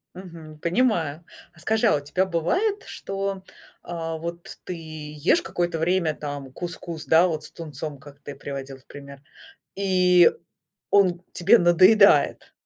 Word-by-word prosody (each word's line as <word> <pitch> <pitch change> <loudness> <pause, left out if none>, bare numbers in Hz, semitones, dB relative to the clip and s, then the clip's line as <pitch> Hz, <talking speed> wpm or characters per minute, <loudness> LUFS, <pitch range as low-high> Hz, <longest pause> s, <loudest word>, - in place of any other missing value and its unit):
Мгм. 165 -4 -11
Понимаю. 170 - 0 0.3
А - - -20
скажи, 220 +1 +1
а - - +4
у - - 0
тебя 180 +7 -1
бывает, 360 - -1
что, 195 -1 -5 0.4
а 165 -2 -5
вот 170 +1 -8
ты 180 - -5
ешь 155 -1 -1
какое-то 175 -2 -2
время, 170 -1 +1
там, 145 -3 -7
кускус, 170 0 -7
да, 165 +3 +5
вот 155 -2 -3
с - - -13
тунцом, 150 -2 -7
как 145 0 -15
ты 145 -1 -9
приводил 135 -1 -7
в 130 - -25
пример, 140 -1 -12 0.5
и 180 -2 +4 0.6
он 180 -3 +3
тебе 205 +7 +4
надоедает? 180 -1 +4
170 Hz, 140 wpm, -24 LUFS, 150-185 Hz, 0.6 s, да